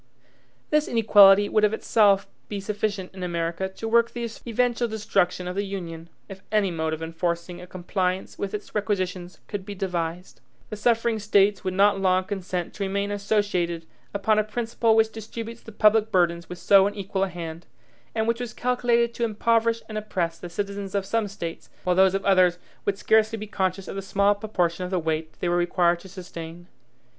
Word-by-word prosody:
This 300 0 +3
inequality 205 -3 +6
would 215 0 +2
of 210 0 +4
itself 205 -3 +3 0.2
be 205 - -3
sufficient 205 -1 -3
in 190 - -9
America 170 +1 -2
to 205 +4 -7
work 235 +1 +4
the 235 -1 -4 0.2
eventual 240 +1 +1
destruction 195 -4 0
of 180 - -4
the 200 - 0
Union, 170 -4 -6 0.2
if 195 -1 -10
any 210 -3 +2
mode 160 -1 -2
of 160 +1 -4
enforcing 170 +1 -3
a 180 - -10
compliance 185 +1 -2
with 200 +1 -3
its 210 - -8
requisitions 185 -4 -2
could 205 -2 -4
be 205 +1 -7
devised. 180 -2 -4 0.3
The - - -3
suffering 230 +1 +1
States 205 -1 +3
would 185 -1 -2
not 200 0 +4
long 185 -1 +3
consent 185 -2 -4
to 200 - -4
remain 200 +1 -1
associated 200 -5 0 0.3
upon 210 +2 +2
a - - +3
principle 225 +1 0
which 220 0 +3
distributes 225 +1 -7
the 225 - -11
public 215 +1 +3
burdens 170 -3 +1
with 180 - -6
so 195 +1 +5
unequal 195 -1 -2
a - - -6
hand, 170 -1 -7 0.5
and 220 0 0
which 230 0 +1
was 240 -2 -5
calculated 240 -1 +1
to 235 - -3
impoverish 230 +1 +1
and 215 -1 -3
oppress 175 -6 -3
the 175 - -7
citizens 200 +2 -4
of 200 -1 0
some 225 +1 0
States, 170 -5 -7
while 180 -1 +1
those 190 0 +5
of 195 - -2
others 185 -2 +4 0.3
would 200 -1 0
scarcely 220 +1 +3
be 215 - -6
conscious 190 -2 -2
of - - -6
the 195 - -3
small 200 +1 +2
proportion 190 -4 -1
of 180 - -4
the 185 - 0
weight 160 -1 -2
they - - 0
were 175 - +2
required 175 0 +2
to 190 - -13
sustain. 175 -2 -9
195 Hz, 190 wpm, -25 LUFS, 180-215 Hz, 0.5 s, inequality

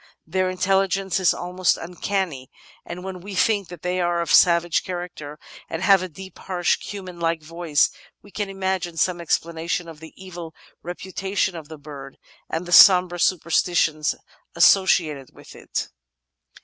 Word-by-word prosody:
Their 185 -1 0
intelligence 195 0 0
is 185 - +4
almost 180 +1 0
uncanny, 175 -5 -3 0.4
and 180 +1 -7
when 190 -1 -7
we 200 +1 -8
think 205 -1 +2
that 175 -2 -11
they 180 0 -1
are 175 0 0
of 170 - -1
savage 170 -1 +4
character 175 -5 -7 0.3
and 165 - -4
have 195 -2 +5
a 185 - -5
deep, 190 +4 -12
harsh, 180 -2 0
hu 205 -2 -6
man 180 -2 -10
like 165 -1 -1
voice, 165 -1 +1 0.3
we 205 - -16
can 205 0 -3
imagine 190 -3 -3
some 175 +2 0
explanation 170 +1 -2
of 160 -2 -11
the 160 0 -12
evil 175 -4 -9 0.3
repu 180 +2 -8
tation 195 0 -1
of 160 -3 -9
the 160 - -9
bird, 140 -2 -11 0.3
and 165 +2 -3
the 175 - -8
sombre 180 -1 +7
superstitions 165 -3 +1 0.4
associated 155 -8 +3
with - - -14
it. - - -4
175 Hz, 160 wpm, -23 LUFS, 165-190 Hz, 0.4 s, sombre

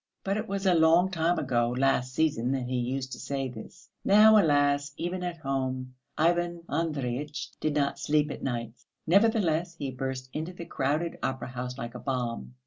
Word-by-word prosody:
But 195 +1 0
it 215 +1 -3
was 195 -1 -3
a 185 - +5
long 165 +3 +5
time 170 0 +1
ago, 120 -3 +1
last 130 -1 +1
season, 130 -6 +1
that 135 -2 -1
he 125 +1 -3
used 130 +2 -2
to - - -6
say 135 -2 -3
this; 110 -3 -11 0.2
now, 215 +2 +7
alas! 145 -2 +2
even 175 +2 -3
at 175 -1 -3
home 130 -3 -3 0.2
Ivan 170 +1 +1
Andreyitch 150 -3 -2
did 155 -1 -1
not 140 -1 0
sleep 150 0 +1
at - - -7
nights. 120 -2 -4 0.2
Nevertheless 175 -4 +3
he 140 -4 -4
burst 130 0 -5
into 160 +4 -4
the 175 -1 -8
crowded 155 +5 -1
opera 130 -1 -3
house 125 0 -5
like 120 -3 -6
a - - -7
bomb. 120 - -3
145 Hz, 180 wpm, -28 LUFS, 130-170 Hz, 0.2 s, now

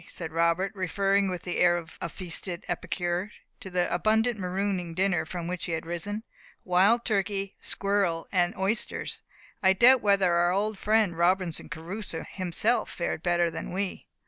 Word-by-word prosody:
said 165 -2 -7
Robert, 170 +4 +1
referring, 195 +1 +1
with 180 -1 -4
the 180 - -3
air 175 -1 +5
of 165 -1 -9
a 170 - -2
feasted 180 +1 -4
epicure, 175 +2 -2 0.3
to 190 - -8
the 180 -1 0
abundant 220 +5 +2
marooning 185 -2 -2
dinner 185 -3 +1
from 175 +1 -5
which 180 0 -3
he 170 - -3
had 160 0 -3
risen. 200 +6 -4 0.4
"Wild 195 +6 +3
turkey, 200 -2 -1
squirrel, 195 -5 0
and 175 -2 +1
oysters! 195 +4 -2 0.4
I 190 -1 +5
doubt 245 +5 +6
whether 200 -3 +3
our 175 +1 +3
old 205 +1 -1
friend 215 -4 +2
Robinson 175 0 +1
Crusoe 170 +1 -5
himself 190 +6 0
fared 170 -2 -3
better 175 -1 +2
than - - -6
we." 195 +1 -3
185 Hz, 160 wpm, -28 LUFS, 175-200 Hz, 0.4 s, doubt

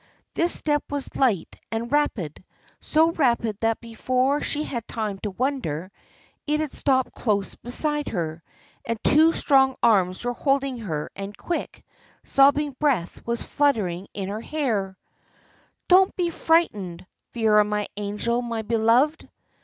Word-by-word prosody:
This 340 +1 +1
step 295 -1 +1
was 285 -1 -4
light 235 -10 +1
and 230 +2 -3
rapid, 220 - -1 0.4
so 320 +2 +3
rapid 235 -8 +1
that 225 0 +1
before 255 +4 0
she 295 - -1
had 235 -6 -5
time 210 -4 -3
to 210 - -3
wonder, 190 - -2 0.6
it 300 +1 +1
had 310 -3 -2
stopped 260 -2 +1
close 205 -4 -1
beside 295 +4 -2
her, 165 -4 -3 0.4
and 230 0 -2
two 315 +3 +5
strong 265 -4 +3
arms 195 -3 +3
were 245 - 0
holding 275 -1 0
her, 160 -9 -4
and 200 +1 -7
quick, 345 - -4 0.4
sobbing 285 +1 +3
breath 260 - 0
was 235 0 -1
fluttering 200 -11 0
her 200 +2 -3
hair. 220 -11 -2 0.9
"Don't 375 +1 +5
be 350 -2 0
frightened! 210 - 0 0.3
Vera, 215 -2 +4
my 210 0 -1
angel, 210 +4 -1
my 230 -2 -3
beloved!" 235 +8 +2
235 Hz, 135 wpm, -24 LUFS, 205-285 Hz, 0.9 s, two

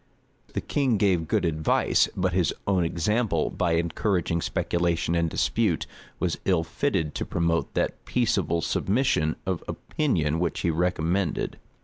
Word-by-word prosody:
[*] - - -31
The - - 0
king 135 -6 +1
gave 95 -5 +2
good - - +1
advice; 80 -1 +2
but 90 -1 +1
his 90 -4 +2
own 95 -3 +2
example, 85 +2 0
by 85 - 0
encouraging 85 +1 0
speculation 85 -1 0
and 85 -1 +1
dispute, - - +1 0.3
was - - -1
ill 90 -4 +2
fitted 80 -1 -1
to - - -2
promote 85 -1 -1
that - - -1
peaceable 95 -9 +1
submission 95 - +1
of 95 -3 -2
opinion 80 - -1
which 85 -2 -1
he 85 - +1
recommended. 90 +1 0
85 Hz, 140 wpm, -26 LUFS, 80-95 Hz, 0.3 s, gave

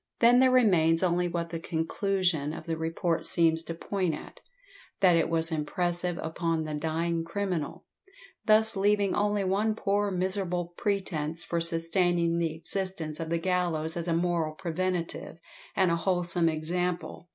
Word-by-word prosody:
Then 240 +1 +6
there 260 0 +6
remains 180 -10 +4
only 175 0 +2
what 170 -1 -3
the 165 - -3
conclusion 165 -2 -1
of - - -8
the 165 -2 -2
report 165 +1 -1
seems 165 -1 +3
to 165 - -5
point 185 -1 -1
at, - - -11 0.6
that 180 -3 +5
it 165 -1 +2
was 165 0 +1
impressive 175 +3 -1
upon 165 0 -1
the 155 -1 -5
dying 165 +2 -1
criminal, 175 -3 -3 0.6
thus 220 0 +5
leaving 200 0 +2
only 205 -1 +1
one 205 +3 +1
poor 205 -1 0
miserable 180 -2 -1
pretence 170 -6 -2
for 170 -1 -2
sustaining 170 0 +1
the 165 -2 0
existence 165 -2 -3
of 165 -1 -4
the 170 - +1
gallows 165 -3 0
as 170 0 -3
a 170 - +1
moral 170 -2 0
preventative, 175 0 -3 0.4
and 185 -3 +3
a 170 - +2
wholesome 175 -1 +1
example. 175 +2 -3
170 Hz, 150 wpm, -28 LUFS, 165-190 Hz, 0.6 s, Then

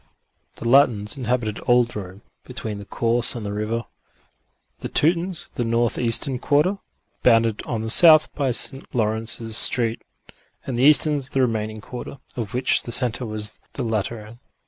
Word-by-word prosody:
The 115 - -6
Latins 120 -4 +3
inhabited 120 -4 -2
old 120 -1 +3
Rome, 95 0 -8 0.2
between 105 -2 -6
the 100 - -8
Course 115 +1 0
and 115 -3 -6
the 100 - -4
river; 110 +2 -3 0.9
the - - -6
Teutons 170 +3 0
the 120 - -2
northeastern 120 +3 0
quarter, 155 +10 +1 0.4
bounded 115 -3 +3
on 115 -3 -3
the 110 - -3
south 155 +1 +6
by 140 -3 -1
St. 135 +3 -2
Laurence's 110 0 -1
Street; 115 0 +3 0.6
and 120 -3 -3
the 130 - +4
Easterns 150 -2 +4
the 135 -2 0
remaining 110 -3 -2
quarter, 125 +5 -8 0.2
of 115 -1 -5
which 125 +1 +2
the 120 - -7
centre 120 0 +1
was 105 0 -1
the 135 - -4
Lateran. 110 +1 -4
120 Hz, 150 wpm, -22 LUFS, 110-130 Hz, 0.9 s, south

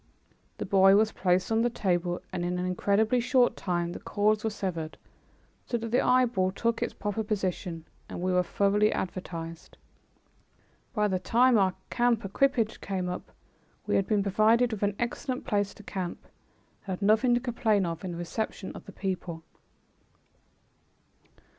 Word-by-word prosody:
The - - -4
boy 195 0 +6
was 215 +1 +3
placed 180 +2 +1
on 225 0 +3
the 240 - +2
table 175 -5 -1
and 175 - -2
in 180 +1 -1
an 180 - -2
incredibly 205 +6 +2
short 250 +1 +3
time 175 -2 -2
the - - -7
cords 210 +1 +1
were 220 - +1
severed 175 -6 -4 0.7
so 240 - 0
that 230 -1 -5
the 245 - +3
eyeball 240 -7 +3
took 230 +2 -1
its - - -1
proper 210 +1 -3
position, 185 -5 -3 0.2
and - - -6
we 185 +1 0
were 180 - +4
thoroughly 200 +4 +2
advertised. 165 -3 -5 1.2
By 210 -1 +2
the 190 -2 0
time 245 +6 +4
our 190 -3 +3 0.2
camp 240 -3 +2
equipage 230 +2 +1
came 185 -2 -2
up, 180 - -6 0.5
we - - 0
had 195 - +2
been 210 -2 +2
provided 220 +5 +3
with 210 - -5
an 205 -1 +1
excellent 250 +2 -3
place 205 -1 0
to 210 - -13
camp, 185 -3 -5 0.6
and 190 -1 -2
had - - -5
nothing 220 +4 +4
to - - +2
complain 225 -5 +1
of 165 0 -4
in 185 - -4
the - - -6
reception 190 +3 -4
of - - -10
the - - -10
people. 180 -4 -4
200 Hz, 165 wpm, -28 LUFS, 180-225 Hz, 1.2 s, boy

